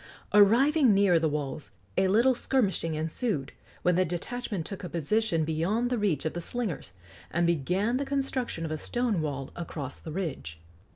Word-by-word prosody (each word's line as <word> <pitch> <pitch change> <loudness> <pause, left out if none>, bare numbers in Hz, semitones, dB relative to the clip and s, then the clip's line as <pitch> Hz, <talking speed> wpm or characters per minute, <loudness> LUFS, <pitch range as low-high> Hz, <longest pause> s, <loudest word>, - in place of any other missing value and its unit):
Arriving 240 +5 +6
near 195 -4 +5
the 160 -1 +1
walls, 145 -1 -4 0.3
a 190 - +3
little 235 +7 +4
skirmishing 200 -10 0
ensued, 155 - -2 0.3
when 180 - +4
the 185 - +4
detachment 185 +2 -4
took 195 +1 -7
a 180 - -4
position 170 +1 +1
beyond 190 +10 0
the 250 - +1
reach 175 -9 0
of 160 - -1
the 175 - -4
slingers, 205 - -4 0.4
and 170 +1 +1
began 180 - +1
the 280 - -1
construction 270 -10 -2
of 160 - -4
a 155 - -2
stone 240 -5 0
wall 140 -3 -4
across 150 -5 -6
the 160 - -8
ridge. 150 - -4
180 Hz, 170 wpm, -28 LUFS, 160-230 Hz, 0.4 s, Arriving